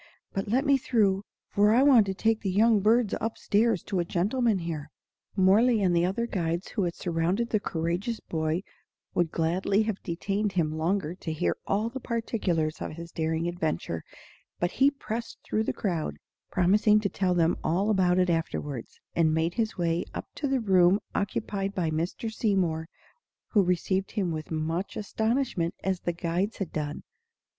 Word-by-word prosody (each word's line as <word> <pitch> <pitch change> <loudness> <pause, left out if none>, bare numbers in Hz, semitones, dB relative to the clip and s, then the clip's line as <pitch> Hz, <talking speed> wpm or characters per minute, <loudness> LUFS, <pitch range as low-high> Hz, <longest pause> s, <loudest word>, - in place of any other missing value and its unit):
But 195 +1 -2
let 255 +7 +1
me 280 -1 +4
through, 205 -6 +2 0.3
for 205 +1 +3
I 255 - +5
want 250 -8 +6
to 190 - -2
take 225 +2 +1
the 200 - -1
young 215 +3 +4
birds 220 +2 +3
up 225 +1 -2
stairs 220 -2 +2
to 195 -3 -2
a - - +2
gentleman 210 +6 +1
here." 160 -4 -4 0.5
Mohrle 215 +5 +5
and 185 -3 +2
the 170 +1 +3
other 215 +5 -1
guides 170 -4 -2
who 200 -5 -1
had 170 - -2
surrounded 175 +7 -1
the 215 - +3
courageous 175 +6 -2
boy 160 +2 -2 0.5
would 175 -2 +1
gladly 185 +5 +1
have 215 -2 -3
detained 195 +4 -2
him 165 -4 +1
longer 165 +2 -1
to 180 -3 -6
hear 90 - 0
all 210 +3 +1
the 255 +3 -5
particulars 200 -10 -1
of - - -4
his 170 +1 -9
daring 160 +1 -1
adventure; 160 - -2 0.6
but 175 +1 0
he 270 +1 +4
pressed 235 -5 -5
through 220 +1 -1
the - - 0
crowd, 165 - -2 0.3
promising 210 +4 +4
to 205 - +1
tell 185 -2 0
them 170 0 +3
all 190 +7 +1
about 185 -3 +3
it 180 -1 +3
afterward, 145 -6 -2 0.3
and 160 -2 +3
made 165 +2 +1
his 220 0 -1
way 170 -1 +1
up - - -4
to 285 - -2
the 270 -1 +1
room 190 -3 +4
occupied 200 -1 -2
by 170 -4 0
Mr. 175 +8 -2
Seymour, 180 -8 0 0.6
who 210 - +4
received 185 +1 0
him 190 -5 0
with 155 -1 -4
as - - -19
much 160 +4 -2
astonishment 220 -4 -1
as 190 -1 0
the 175 - -1
guides 175 +5 -1
had 195 -5 -4
done. 150 -1 -3
190 Hz, 180 wpm, -28 LUFS, 170-215 Hz, 0.6 s, want